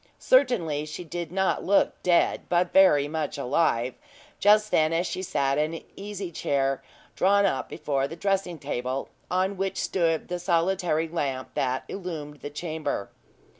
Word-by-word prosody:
Certainly 180 - +2
she 155 +3 -6
did 170 0 -5
not 190 +1 0
look 200 +2 +2
dead, 175 -1 +2
but 175 0 +1
very 150 -7 +6
much 155 0 -3
alive, 125 -3 +1 0.5
just 210 +1 +4
then, 155 0 +3
as 170 +2 +1
she 185 - -3
sat 140 -7 0
in 155 +2 0
an - - -8
easy 200 -2 -6
chair, 135 -3 0 0.3
drawn 200 +1 +4
up 135 -9 -1
before 140 -4 -1
the 165 - -8
dressing 190 -1 -1
table, 130 -2 -3 0.2
on 190 +2 0
which 195 0 -2
stood 165 -4 0
the 180 0 -3
solitary 170 -1 +1
lamp 135 -6 -3
that 130 0 -1
illumed 160 -6 -6
the - - -6
chamber. 150 - -4
165 Hz, 155 wpm, -26 LUFS, 145-190 Hz, 0.5 s, very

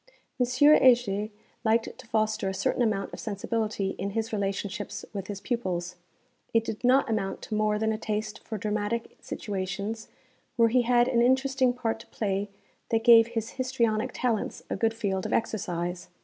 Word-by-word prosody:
M. 245 - +3
Heger 245 -6 +5 0.3
liked 225 0 +1
to - - -12
foster 215 -3 0
a 190 - -4
certain 195 +5 0
amount 210 -4 0
of - - -7
sensibility 210 -1 -2
in 200 - -2
his 225 0 -2
relationships 200 0 -3
with 195 -2 -5
his 205 -1 -5
pupils 180 -7 -2 0.6
it 225 - +5
did 220 0 -5
not 260 +2 +4
amount 210 -4 -2
to - - -6
more 215 0 +2
than 220 +1 +1
a 215 - -4
taste 215 -1 -3
for 220 - -6
dramatic 210 +2 -2
situations 200 +2 -4 0.5
where 230 -2 +4
he 250 +2 +4
had 240 0 +3
an 235 -2 +2
interesting 260 +1 +3
part 235 -3 -2
to - - -13
play 200 -1 -2 0.4
that 225 -1 +1
gave 230 -1 +8
his 230 -1 -3
histrionic 250 -3 0
talents 240 -4 -2
a - - +1
good 225 +3 +1
field 195 -4 -1
of - - -3
exercise. 180 -5 -2
220 Hz, 170 wpm, -27 LUFS, 200-235 Hz, 0.6 s, gave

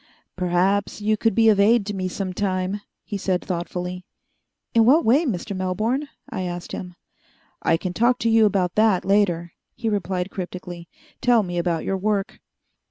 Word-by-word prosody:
"Perhaps 185 +3 +1
you 215 +1 +1
could 225 -1 0
be 225 -1 +4
of 205 -2 +4
aid 215 +1 +4
to 205 - -3
me 185 -1 -2
some 185 0 -4
time," 190 +1 -1 0.2
he 205 - -5
said 185 -2 -1
thoughtfully. 180 0 -4 0.7
"In 230 - +5
what 280 +9 +5
way, 270 +9 +4
Mr. 200 -2 -3
Melbourne?" 215 +10 -1 0.2
I - - -4
asked 175 -1 -5
him. 180 -1 -6 0.7
"I 165 - +2
can 180 +1 -4
talk 240 +5 +3
to 230 - +2
you 225 -1 +6
about 185 -3 0
that 215 -4 +3
later," 180 -4 +2 0.2
he 230 - -2
replied 190 -2 -2
cryptically. 180 -2 -7 0.3
"Tell 240 -3 +4
me 175 -2 -3
about 170 -2 -1
your 195 - -1
work." 200 0 -1
195 Hz, 170 wpm, -23 LUFS, 180-215 Hz, 0.7 s, you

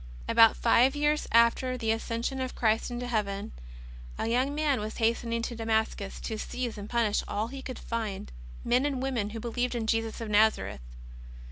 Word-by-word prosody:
About 230 -1 +6
five 245 +4 +4
years 295 +1 +1
after 235 +2 +3
the 225 -2 0
Ascension 230 +4 -2
of 255 -1 -4
Christ 225 +1 +1
into 245 0 -4
Heaven, 205 -4 -2 0.7
a - - -2
young 255 +5 +1
man 295 -3 +1
was 215 +1 -5
hastening 230 0 0
to 235 - -3
Damascus 220 -3 -1
to 220 -1 -4
seize 245 0 -4
and 205 0 -8
punish 230 -3 +1
all 215 +3 -2
he 270 +1 -7
could 255 -2 -6
find, 215 - -4 0.3
men 245 +2 +3
and 275 -3 -2
women 250 -6 -1
who 225 +1 -6
believed 245 +2 -2
in 230 -2 -2
Jesus 225 0 -1
of 230 - -4
Nazareth. 205 - +2
230 Hz, 175 wpm, -29 LUFS, 220-250 Hz, 0.7 s, About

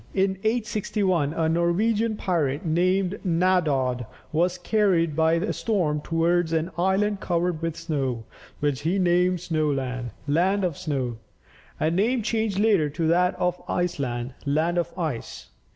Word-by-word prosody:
In 190 0 +1
861 210 -8 0
a 165 -1 +1
Norwegian 205 +7 +1
pirate, 155 -7 -1
named 185 +4 +1
Naddod, 155 - +1 0.2
was 175 +3 +1
carried 175 -5 +1
by 160 +1 +3
a 170 +6 0
storm 170 -9 0
towards 165 +1 +1
an 165 +2 0
island 195 +3 +1
covered 175 -2 -1
with 165 -1 -3
snow, 135 -7 -2 0.4
which 145 -2 0
he 170 +6 0
named 180 -1 +2
Snoland 140 -7 -1 0.2
(land 185 +7 +2
of 175 -5 0
snow), 135 -9 -3 0.6
a 155 - +1
name 220 +7 +1
changed 220 -2 -1
later 200 -8 +3
to 160 +3 -2
that 180 +2 +3
of 180 0 -1
Iceland 130 -8 -2
(land 160 +5 +1
of 170 - -2
ice). 155 -9 -4
175 Hz, 135 wpm, -25 LUFS, 155-190 Hz, 0.6 s, by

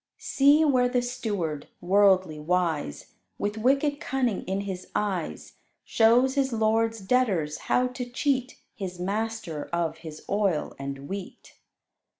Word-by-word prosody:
See 285 +3 +4
where 255 -4 +3
the 245 -1 +1
steward, 205 - -3
worldly 185 -3 +3
wise, 160 - -1 0.2
With 205 +2 -2
wicked 275 +4 +2
cunning 250 -7 -1
in 190 +2 -1
his 190 -2 -6
eyes, 190 -6 -3 0.3
Shows 240 +4 +4
his 270 -1 +1
lord's 225 0 +1
debtors 190 -9 +1
how 250 - +3
to 250 -1 -6
cheat 255 0 -1
His 185 -6 -6
master 205 -4 -3
of 165 -2 -2
his 160 -2 -10
oil 195 -6 0
and 140 0 -6
wheat. 195 +1 -8
205 Hz, 130 wpm, -26 LUFS, 175-250 Hz, 0.3 s, See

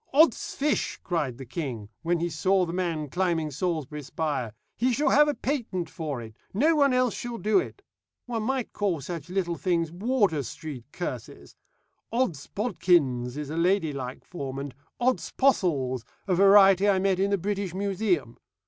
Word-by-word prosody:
'Od's 315 +3 +4
fish,' 295 +1 0
cried 150 -9 -1
the 135 - -8
king, 125 - -5
when 170 0 +1
he 170 - +1
saw 180 +4 +2
the 170 - -5
man 170 -4 -1
climbing 165 0 0
Salisbury 150 -1 -2
spire; 145 -5 -2 0.2
'he 250 +3 +1
shall 285 +5 +2
have 295 +1 +6
a 295 - 0
patent 220 - -2
for 150 -6 -4
it 110 -2 -9 0.2
no 310 +9 +4
one 280 -2 +4
else 250 -2 +2
shall 240 -1 -5
do 210 -2 +3
it.' 395 - -6 0.4
One 235 -2 -2
might 255 +2 -2
call 195 -6 0
such 165 +2 -6
little 180 -2 -1
things 170 -3 0
Wardour 200 - +1
Street 140 -3 -7
curses. 175 - -6 0.6
'Od's 200 - -1
bodkins' 160 - +1
is 150 -1 -5
a 160 - -4
ladylike 160 -8 0
form, 135 -6 -6
and 140 -1 -5 0.3
'Od's 255 +1 0
possles' 145 - +2 0.2
a 190 - +2
variety 195 +1 +6
I 195 - +4
met 190 -1 +1
in 195 +1 +2
the 200 - +2
British 195 -1 -3
Museum. 190 - -1
180 Hz, 165 wpm, -27 LUFS, 150-205 Hz, 0.6 s, have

